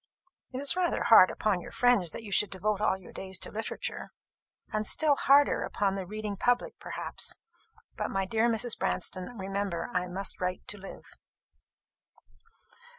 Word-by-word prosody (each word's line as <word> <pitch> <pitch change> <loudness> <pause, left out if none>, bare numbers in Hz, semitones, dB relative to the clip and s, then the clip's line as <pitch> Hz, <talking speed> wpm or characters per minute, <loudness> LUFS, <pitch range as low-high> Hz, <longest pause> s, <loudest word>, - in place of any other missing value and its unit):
"It 255 - -5
is 285 +4 +1
rather 360 -2 +1
hard 220 -5 +8
upon 195 -4 0
your - - -9
friends 245 -8 +3
that 225 - -7
you 205 - -8
should 205 0 +3
devote 200 +2 -1
all 190 - +2
your 190 - -14
days 190 -1 -5
to - - -5
literature." 220 +1 -4 0.6
"And 215 0 0
still 305 -2 +3
harder 280 +1 +4
upon 200 -3 0
the 195 -2 -4
reading 210 0 -4
public, 245 +4 +1
perhaps. - - -3 0.6
But, - - -2
my 195 0 -1
dear 225 +4 +2
Mrs. 230 +1 -1
Branston, 185 +6 -2
remember, 195 -1 -3
I 180 0 0
must 190 +2 -3
write 180 0 -2
to 205 - -4
live." 195 - -10
205 Hz, 160 wpm, -29 LUFS, 190-235 Hz, 0.6 s, hard